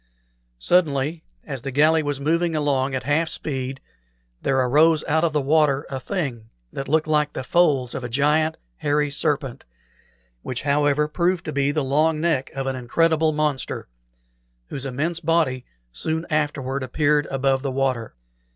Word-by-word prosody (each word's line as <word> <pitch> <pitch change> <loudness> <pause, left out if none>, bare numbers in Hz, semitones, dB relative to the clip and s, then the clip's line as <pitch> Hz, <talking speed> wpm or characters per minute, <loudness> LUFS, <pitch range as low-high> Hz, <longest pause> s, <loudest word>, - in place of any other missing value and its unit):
Suddenly, 155 - +1 0.2
as 135 -5 -5
the 135 - -4
galley 155 +4 +4
was 145 -2 -2
moving 165 +3 +1
along 140 -3 0
at 130 - -3
half 150 +5 +1
speed, 135 -2 -3 0.6
there 135 -1 +1
arose 150 +5 +4
out 160 +2 +2
of 170 - +2
the 150 - +1
water 145 -1 +2
a 135 - -3
thing 130 - -4 0.2
that 135 - -5
looked 155 +2 +2
like 150 -1 +1
the 130 - -4
folds 140 -6 +2
of 130 - -5
a 120 - -4
giant 150 +5 +2 0.2
hairy 145 0 0
serpent, 140 -3 -1 0.8
which, 125 - -4
however, 145 +1 +2
proved 175 +3 0
to 155 - -4
be 140 0 +1
the 150 0 -1
long 150 +4 +2
neck 160 -5 0
of 135 0 -3
an 135 0 -1
incredible 160 +6 +2
monster, 150 -3 -2 0.8
whose 135 0 -4
immense 155 +6 -2
body 155 -6 +1 0.3
soon 160 - -2
afterward 145 -3 -1
appeared 145 +3 +1
above 135 0 0
the 140 - -2
water. 130 - -1
145 Hz, 160 wpm, -23 LUFS, 135-155 Hz, 0.8 s, galley